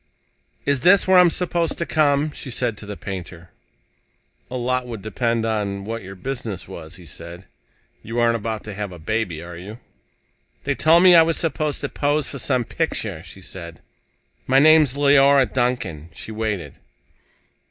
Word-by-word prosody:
"Is 140 -1 +1
this 185 +8 +5
where 185 -1 +7
I'm 180 -1 +7
supposed 170 -1 -1
to 170 - -2
come?" 150 -1 +2
she 140 - -7
said 120 -2 -1
to 105 - -10
the 105 -1 -6
painter. 90 -3 -8 1.0
"A 130 - -4
lot 125 +1 -1
would 115 -4 -7
depend 115 +1 -1
on 100 -3 -2
what 115 +1 -4
your 95 0 -10
business 110 -3 -5
was," 80 0 -10
he 90 -1 -14
said. 85 +4 -10 0.6
"You 115 +2 -4
aren't 115 0 +3
about 110 -1 -4
to 105 - -7
have 100 -1 -5
a 90 - -9
baby, 85 -2 -3
are 85 0 -9
you?" 100 +6 -9 0.9
"They - - 0
told 165 +3 +4
me 185 -1 +8
I 170 - +9
was 165 0 +2
supposed 155 -3 -1
to 145 - -3
pose 145 0 0
for 140 - -6
some 125 -1 +1
picture," 110 - -3
she 95 +2 -13
said. 85 -3 -9 0.6
"My 130 - +4
name's 150 -2 +6
Leora 140 -1 +5
Duncan." 120 - -2
She 110 - -8
waited. 110 -4 -4
115 Hz, 175 wpm, -22 LUFS, 100-145 Hz, 1.0 s, I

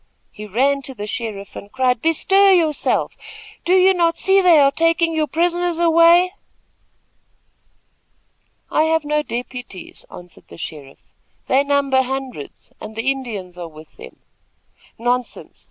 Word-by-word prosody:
He 210 0 -10
ran 275 +7 +1
to 265 -1 -10
the 205 -2 -6
sheriff 210 -2 -6
and 200 - -10
cried: 255 -2 0
"Bestir 385 +5 +3
yourself! 320 -5 0 0.5
Do 360 - +2
you 375 +1 +5
not 335 -2 +1
see 390 0 +3
they 355 -3 +5
are 280 -1 +5
taking 330 +2 +1
your 310 -1 0
prisoners 345 +2 -1
away?" 340 +2 +4 2.4
"I 310 - +2
have 320 -1 0
no 300 +1 0
deputies," 245 -6 -8
answered 175 -2 -14
the - - -14
sheriff. 145 -4 -10 0.3
"They 270 +2 +2
number 280 -2 +1
hundreds, 260 - -7
and 215 0 -9
the 230 +4 0
Indians 205 -10 -7
are 175 - -6
with 155 0 -16
them." - - -12 0.8
"Nonsense! 245 +1 -3
275 Hz, 140 wpm, -19 LUFS, 230-335 Hz, 2.4 s, you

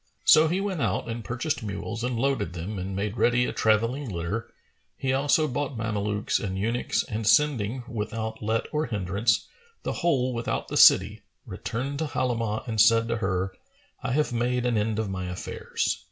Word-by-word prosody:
So 155 +1 +7
he 175 +4 0
went 195 -6 -2
out - - 0
and 115 0 -4
purchased 130 +6 -2
mules 110 +2 -5
and 125 -1 -1
loaded 135 -9 0
them 90 +4 -5
and 95 +1 -4
made 100 +3 -2
ready 120 +1 +3
a - - -3
travelling 115 +5 +1
litter, 95 +5 -4 0.5
he 130 -1 0
also 145 +3 +3
bought 140 -1 -3
Mamelukes 105 -1 -1
and 95 -3 -3
eunuchs 115 +5 0
and 110 0 -4
sending, 125 -3 +3
without 110 0 -4
let 110 +1 0
or 150 +1 0
hindrance, 105 +1 0 0.4
the - - -2
whole 130 -7 +2
without 115 0 -3
the - - -4
city, - - +6 0.2
returned 135 +5 -4
to 160 - 0
Halimah 115 -5 -1
and 110 -3 +2
said 115 +1 +5
to 115 - 0
her, 95 -2 -1 0.5
"I 125 - -2
have 150 -3 +1
made 125 +1 0
an 120 -1 +1
end 105 0 0
of 110 -1 -1
my 95 -1 -3
affairs." 90 - -3
115 Hz, 180 wpm, -26 LUFS, 105-130 Hz, 0.5 s, So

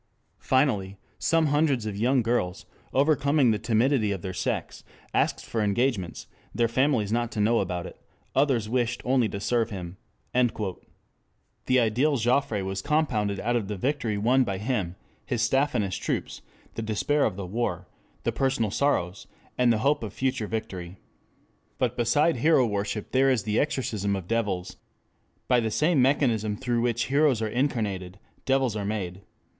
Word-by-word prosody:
Finally, 105 -8 +1 0.2
some 165 0 +2
hundreds 145 -5 +2
of 105 -2 -3
young 120 +4 +2
girls, 115 -3 -1 0.3
overcoming 140 -2 +3
the 105 - 0
timidity 115 -1 +2
of 95 -3 -4
their 95 - -4
sex, - - -3 0.3
asked - - 0
for 115 - -2
engagements, 105 -2 0 0.3
their 120 -1 +3
families 115 -3 +1
not 120 0 0
to 110 - -4
know 115 +3 +3
about 90 -2 -2
it; - - -11 0.3
others 135 -6 +2
wished 120 0 -1
only 125 -3 +2
to 100 - -5
serve 115 +2 0
him." 90 -3 -7 0.4
This 120 +2 -3
ideal 125 +5 +2
Joffre 120 -3 +1
was 95 0 -3
compounded 110 -9 0
out 120 +2 0
of 110 -5 -1
the 105 - -3
victory 120 -2 -1
won 125 +6 +3
by 100 -5 -3
him, 105 -5 -2 0.3
his 120 -3 -1
staff 135 +3 +2
and 110 - +2
his 95 - -3
troops, - - -3 0.3
the - - -4
despair 115 +7 0
of 105 - 0
the 100 -1 -5
war, 90 -3 -2 0.4
the - - +1
personal 130 -6 0
sorrows, 100 -9 0 0.3
and 125 -1 +3
the 115 - +2
hope 145 +1 +3
of 105 - -5
future 130 -4 -1
victory. 95 -5 -5 0.8
But - - 0
beside 130 +7 +2
hero 140 0 +4
worship 105 0 -3
there 135 +1 +4
is 125 -6 +1
the 105 +2 0
exorcism 105 -8 -1
of 95 -3 -6
devils. 95 -5 -2 0.7
By 125 -1 +4
the 115 -1 0
same 150 +5 +2
mechanism 115 -6 +2
through 120 -2 -1
which 120 -1 +1
heroes 140 -3 +3
are 110 - -1
incarnated, 105 -7 -2 0.3
devils 135 -4 +1
are 105 - -2
made. 100 -3 -3
115 Hz, 165 wpm, -26 LUFS, 100-130 Hz, 0.8 s, hero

